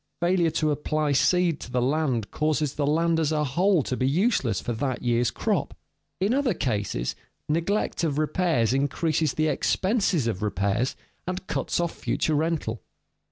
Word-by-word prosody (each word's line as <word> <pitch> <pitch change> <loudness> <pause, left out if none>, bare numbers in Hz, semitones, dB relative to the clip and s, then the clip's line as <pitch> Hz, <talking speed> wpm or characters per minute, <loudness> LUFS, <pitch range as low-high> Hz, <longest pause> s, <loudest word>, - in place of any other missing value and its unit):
Failure 175 -1 +2
to 155 -1 0
apply 150 0 -1
seed 170 +3 +2
to - - -8
the 125 0 0
land 130 -4 0
causes 155 -2 0
the 145 -1 -1
land 165 +2 +2
as 160 -1 +1
a 150 -1 +1
whole 170 +4 +2
to 130 - -2
be 130 +1 0
useless 145 - +1
for 120 - -3
that 130 +2 -2
year's 120 -1 +2
crop. - - -2 0.4
In 200 +5 +1
other 265 -7 +1
cases, 100 - -2 0.3
neglect 170 +6 0
of 150 -4 0
repairs 155 - +1
increases 145 +2 0
the 155 0 +1
expenses 190 - +1
of 110 -4 -2
repairs 100 +4 0 0.3
and 185 +1 -4
cuts - - -2
off 170 -1 0
future 155 - -1
rental. 150 -7 -1
150 Hz, 160 wpm, -26 LUFS, 125-170 Hz, 0.4 s, Failure